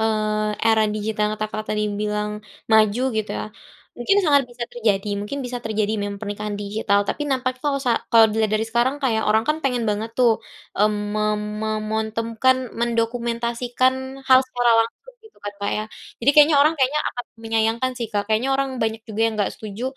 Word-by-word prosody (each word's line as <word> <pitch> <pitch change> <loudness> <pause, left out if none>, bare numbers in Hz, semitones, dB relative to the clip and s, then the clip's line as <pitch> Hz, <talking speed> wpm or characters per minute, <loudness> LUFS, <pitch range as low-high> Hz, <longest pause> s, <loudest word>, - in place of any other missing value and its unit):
eee, 215 -1 0 0.2
era 220 -1 +4
digital 215 0 -2
yang 210 - 0
kata 215 0 -2
Kakak 215 0 -5
tadi 210 0 0 0.2
bilang 210 0 -1 0.4
maju 215 +1 +4 0.2
gitu 215 -1 -2
ya? - - -3 0.5
Mungkin 320 +12 +2
sangat 285 -3 +5
bisa 240 0 -7
terjadi, 210 -4 0
mungkin 210 +8 -4
bisa 245 -1 -4
terjadi 215 -1 0
mem 205 0 -3
pernikahan 210 0 -4
digital. 205 0 0
Tapi 295 - -2
nampak 255 -2 -1
kalo 285 -1 +1
sa 250 - +2 0.2
kalau 225 -1 +8
dilihat 215 0 0
dari 215 - +1
sekarang, 240 +4 +1
kayak 225 -5 +1
orang 220 +1 +3
kan 305 - +2
pengen 250 -3 +1
banget 215 +2 -3
tuh, 235 -3 +3 0.4
mmm, 210 +1 +4 0.2
mem 210 0 +1 0.3
memontemkan 220 +3 0 0.2
mendokumentasikan 235 +2 0 0.3
hal 260 -1 +6
secara 245 -2 +1
langsung, 345 - -2
gitu 440 -1 -19
kan 205 - -4
Kak 200 0 -2
ya? 215 - -2 0.4
Jadi 265 - +5
kayaknya, 295 +1 +6
orang 310 +2 +3
kayaknya 275 +3 +2
akan 245 - -6 0.2
menyayangkan 225 +2 0
sih 235 - -2
Kak. 205 -1 +1
Kayaknya 225 +5 +1
orang 275 0 0
banyak 225 -1 -2
juga 220 -1 -6
yang 225 - -2
enggak 205 -2 0
setuju, 215 +1 -7
225 Hz, 185 wpm, -22 LUFS, 215-250 Hz, 0.5 s, kalau